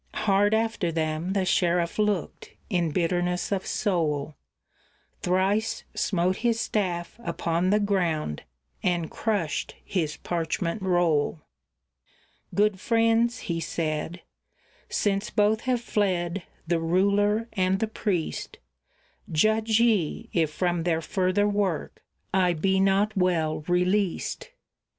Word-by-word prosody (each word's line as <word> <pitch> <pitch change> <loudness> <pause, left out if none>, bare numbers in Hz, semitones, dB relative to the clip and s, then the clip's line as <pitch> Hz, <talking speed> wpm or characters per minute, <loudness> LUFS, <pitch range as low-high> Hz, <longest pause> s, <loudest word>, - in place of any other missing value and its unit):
Hard 205 +1 +3
after 220 -6 0
them 160 +3 -1
the 195 -2 +1
sheriff 175 0 +1
looked, 210 -6 -1 0.2
in 175 -3 +1
bitterness 180 +2 0
of 195 -1 -1
soul; 155 -7 0 0.9
Thrice 195 +5 +1
smote 185 -1 0
his 230 0 +1
staff 185 -3 -2
upon 170 +1 0
the 210 +2 +4
ground, 175 - 0 0.4
and 175 -3 0
crushed 200 -9 -2
his 160 -6 -2
parchment 170 +3 -2
roll. 175 -5 +1 1.1
"Good 205 -1 +2
friends," 230 +1 +2
he 165 -1 -2
said, 160 +1 -3 0.7
"since 200 0 0
both 215 +1 +2
have 245 -2 +2
fled, 185 -5 -1 0.2
the 170 0 +1
ruler 200 +6 +2
and 190 -1 +1
the 220 - +1
priest, 200 -6 -3 0.7
Judge 220 +6 +3
ye, 215 -10 +1
if 160 -3 +2
from 175 +1 0
their 165 -1 0
further 185 +3 +1
work 200 -5 -1 0.3
I 185 -2 +3
be 190 +4 +1
not 195 +2 +2
well 175 -4 +1
released." 185 - 0
185 Hz, 115 wpm, -26 LUFS, 170-205 Hz, 1.1 s, the